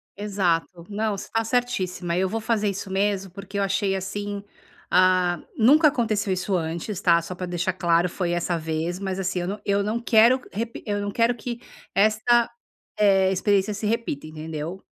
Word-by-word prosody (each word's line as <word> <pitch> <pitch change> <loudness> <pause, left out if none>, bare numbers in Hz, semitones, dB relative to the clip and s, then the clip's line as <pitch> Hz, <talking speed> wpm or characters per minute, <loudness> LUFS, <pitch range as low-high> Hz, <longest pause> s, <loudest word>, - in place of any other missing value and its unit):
Exato. 180 -4 -1
Não, 210 0 -1
você - - -8
tá 225 0 +1
certíssima. 220 -8 -1
Eu 190 +1 +2
vou 225 - -2
fazer 215 -2 +1
isso 195 0 -5
mesmo, 195 -1 0
porque 195 +1 -6
eu - - +2
achei, 195 0 0
assim, 200 +1 -4 0.5
ah 180 -1 +3 0.2
nunca 290 +8 +6
aconteceu 215 -6 0
isso 185 +1 -1
antes, 170 +4 -3
tá? 170 -3 +4
Só 180 +2 -7
para 180 - -4
deixar 180 +1 -1
claro, 175 -1 +2
foi 175 0 -2
essa 175 0 0
vez. 160 +2 -3
Mas 190 -1 -3
assim, 185 -1 -1
eu 190 +4 -3
eu 200 0 +2
não 215 +3 -1
quero 235 +2 +5
repi 230 +3 -5
eu 205 -1 -1
não 205 0 -3
quero 230 +3 +2
que 240 +1 -5 0.3
esta, 220 +3 +3 0.5
eh, 195 -2 +4
experiência 195 +2 +1
se 205 +1 -5
repita, 220 -10 -2
entendeu? 155 +3 -6
195 Hz, 175 wpm, -24 LUFS, 180-215 Hz, 0.5 s, nunca